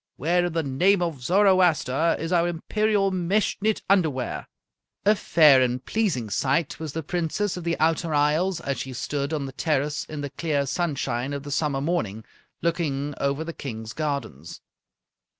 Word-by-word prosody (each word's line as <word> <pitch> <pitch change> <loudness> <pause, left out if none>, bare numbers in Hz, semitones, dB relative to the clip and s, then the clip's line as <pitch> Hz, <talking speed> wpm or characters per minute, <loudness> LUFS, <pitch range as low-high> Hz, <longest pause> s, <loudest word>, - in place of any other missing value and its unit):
Where 175 +5 +1
in 175 - -3
the 165 -1 0
name 175 +8 +2
of 160 -6 -3
Zoroaster 170 -3 +3
is 165 +2 -3
our 170 -1 +3
imperial 200 +4 0
mesh 185 +3 +1
knit 215 +1 0
underwear?" 160 -10 0 0.6
A 210 - +6
fair 155 -9 +5
and 125 0 0
pleasing 160 - -1
sight 140 - 0
was 155 -3 -5
the 160 - -3
Princess 175 +5 -1
of 180 - -6
the 170 0 -1
Outer 160 +1 +1
Isles 155 +5 +2
as 140 -3 -3
she 130 - -5
stood 140 +3 -3
on 150 -3 -2
the 135 - -6
terrace 150 0 -1
in 150 -2 -6
the 145 -1 -5
clear 145 0 -1
sunshine 135 -5 -2
of 140 -1 -4
the 145 - -7
summer 145 -2 0
morning, 110 - -2 0.4
looking 145 -4 -1
over 140 +3 0
the 165 +1 -6
King's 110 -6 -7
gardens. 140 - -4
155 Hz, 170 wpm, -25 LUFS, 140-175 Hz, 0.6 s, A